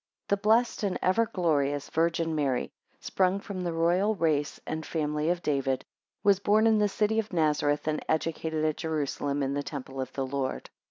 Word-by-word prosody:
THE 200 - +3
blessed 220 +4 +2
and 200 -3 0
ever 220 +5 +3
glorious 145 -8 0
Virgin 165 0 +1
Mary, 140 -5 0 0.3
sprung 190 +1 +1
from 200 -2 -6
the 175 -1 -2
royal 175 +6 +2
race 155 -5 0
and 160 0 -3
family 150 -1 -1
of 175 0 -1
David, 135 -3 0 0.4
was 200 -2 +4
born 210 +2 +3
in 220 -1 +4
the 210 -1 +3
city 215 +2 +1
of 220 -1 -3
Nazareth, 150 -3 +1
and 155 0 -1
educated 160 0 -1
at 155 -1 0
Jerusalem, 145 -2 -2
in 135 +1 -1
the 145 - -1
temple 135 -2 -6
of 130 0 -5
the 135 - -2
Lord. 130 0 -3
160 Hz, 180 wpm, -28 LUFS, 145-195 Hz, 0.4 s, was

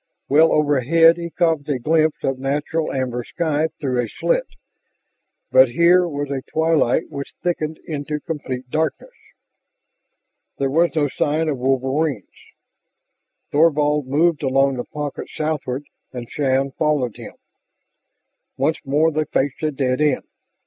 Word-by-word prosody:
Well 155 +3 +5
overhead 150 +3 +4
he 170 0 -5
caught 160 -3 0
a 140 - +1
glimpse 155 +4 +1
of 135 -1 -1
natural 145 +4 -1
amber 125 -2 -2
sky 155 +2 -1
through 130 -4 -1
a 115 - -4
slit, - - 0 1.0
but 130 -1 +6
here 175 +7 +4
was 145 -3 -4
a 135 -1 -2
twilight 160 -4 +1
which 140 0 -7
thickened 160 -3 -2
into 150 -1 -4
complete 130 -5 -5
darkness. 160 - -2 1.4
There 135 -1 -1
was 170 +4 +3
no 150 -2 +2
sign 155 +3 0
of 140 -4 -2
wolverines. 135 - 0 1.3
Thorvald 150 -2 +2
moved 155 +3 +2
along 135 -1 +2
the 125 - -4
pocket 150 -2 -6
southward, 150 -3 -3 0.3
and 120 -2 -7
Shann 135 -1 0
followed 145 -6 0
him. - - -9 1.2
Once 140 +4 0
more 150 +4 +2
they 155 0 -1
faced 135 -1 -1
a 155 - +1
dead 135 -1 -1
end. 150 -3 +2
145 Hz, 135 wpm, -21 LUFS, 135-160 Hz, 1.4 s, but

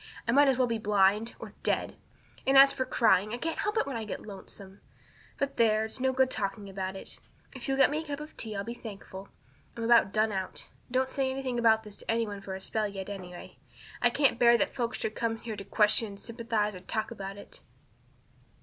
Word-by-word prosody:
I - - +3
might 285 +3 +6
as 265 -2 +3
well 255 - +4
be 230 -2 -2
blind 210 +2 +2
or - - -9
dead. - - 0 0.5
And 270 0 +5
as 275 0 +9
for 260 - -1
crying, 215 -4 +3
I - - -5
can't 325 +6 -3
help 420 +1 -1
that 445 - +2
when 275 -4 -4
I 225 - -4
get 215 - -6
lonesome. 195 -1 -11 0.6
But 280 0 -2
there, 220 -1 +3
it's 220 - -4
no 260 +1 +2
good 260 0 +2
talking 200 0 -3
about 190 0 -4
it. 190 - -7 0.3
If 260 -3 -6
you'll 270 0 0
get 270 - +5
me 305 +2 -1
a - - -15
cup 285 0 -4
of 300 +1 -9
tea 220 -2 -3
I'll 200 - -2
be 235 - -5
thankful. 200 -4 -9 0.5
I'm 230 - -3
about 230 -4 +5
done 215 +1 +2
out. 190 -2 -5 0.2
Don't 255 +1 +1
say 265 0 -1
anything 260 -2 -2
about 220 -1 +4
this 210 -1 -8
to - - -13
any 230 0 +2
one 205 -2 -7
for 190 -1 -6
a 190 - -8
spell 215 +2 -1
yet, 195 -1 -6
anyway. 180 -3 -9 0.4
I 240 - +5
can't 260 -1 +2
bear 235 -1 +6
that - - 0
folks 240 -1 -2
should 215 - -2
come 225 -1 -1
here 225 -1 -6
to 200 - -7
question 210 +2 +3
and 200 -1 -10
sympathize 225 -2 -2
and 185 -1 -11
talk 220 +1 -2
about 195 -3 -6
it." - - -10
225 Hz, 230 wpm, -29 LUFS, 200-255 Hz, 0.6 s, as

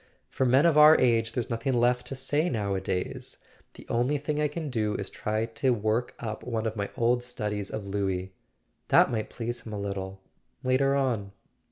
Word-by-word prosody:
"For 130 - +1
men 130 +5 +5
of 160 -3 +5
our 155 +1 +9
age 115 -2 +2
there's 120 -2 -3
nothing 115 +3 -1
left 120 +1 +2
to 135 - -5
say 145 +6 0
nowadays. 100 -5 -2 0.4
The - - -12
only 125 +5 +1
thing 150 +1 -2
I 150 - +3
can 150 -1 -5
do 110 -3 0
is 100 - -4
to - - -15
try 110 +1 -1
to 115 +3 -1
work 110 +3 -1
up 110 -2 -5
one 115 -2 -2
of 110 0 -2
my 100 -1 -3
old 120 +1 +2
studies 105 -5 -4
of 105 -2 -5
Louis. 95 -2 -2 0.5
That - - +5
might 110 -2 -2
please 120 0 -4
him 110 - -8
a 105 - -3
little— 95 -1 -4 0.4
later 135 +2 +2
on." 115 -8 -1
115 Hz, 195 wpm, -28 LUFS, 105-130 Hz, 0.5 s, our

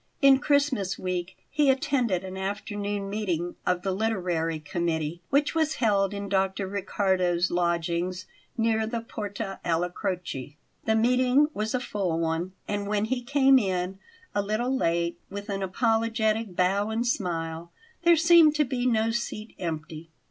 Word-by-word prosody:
In 275 -1 +6
Christmas 285 -9 +1
week 180 0 -3
he 290 -1 +3
attended 250 -8 +1
an 190 0 -7
afternoon 205 +1 -3
meeting 180 -4 -2
of 180 0 +1
the 195 - 0
literary 180 -6 -1
committee 160 +1 -2
which 285 +2 +2
was 315 -1 +1
held 200 -4 +2
in 200 0 -5
Dr. 195 0 0
Riccardo's 185 -2 0
lodgings 175 +1 -1 0.3
near 225 -1 +1
the 230 0 -3
Porta 205 -3 -5
alla 175 +1 0
Croce. 150 -7 -4 0.3
The 220 - +2
meeting 250 +5 +3
was 215 +3 -2
a - - +1
full 195 -8 -2
one, 165 +3 -1
and 205 -1 -2
when 210 0 +1
he 245 +2 -1
came 270 +1 +5
in, 190 -2 -2 0.3
a 205 - +1
little 220 +6 -1
late, 170 -6 0
with 200 +2 -7
an 195 -1 -2
apologetic 225 0 0
bow 195 +4 +2
and 225 +2 -1
smile, 170 -6 -2 0.3
there 340 -1 +5
seemed 325 -1 +6
to 300 0 +3
be 250 -1 -1
no 225 -2 +2
seat 225 -2 -4
empty. 160 -1 -5
200 Hz, 150 wpm, -27 LUFS, 180-230 Hz, 0.3 s, In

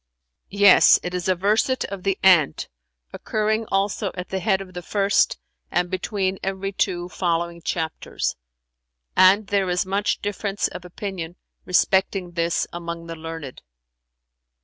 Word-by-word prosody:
"Yes; 200 -1 +6
it 180 - -4
is 180 0 -3
a 185 - +3
verset 215 +8 +1
of 200 -1 -6
'The 195 0 0
Ant'[FN#366] 175 -7 +4 0.5
occurring 215 +1 -1
also 195 0 0
at 180 -1 -6
the 190 - -2
head 190 +1 +1
of 190 -1 -9
the 180 - -6
first 200 +2 +1 0.3
and 175 0 0
between 190 0 -2
every 195 +1 -3
two 180 -3 -1
following 170 -1 -2
chapters; 160 -1 -3 0.8
and 190 +3 +6
there 195 -2 0
is 180 +1 0
much 200 +2 0
difference 205 0 -2
of 180 - -9
opinion, 180 -2 -6 0.3
respecting 190 0 +1
this, 170 -1 0
among 170 -1 -6
the 165 0 -6
learned." 160 -4 -8
185 Hz, 140 wpm, -23 LUFS, 175-195 Hz, 0.8 s, Yes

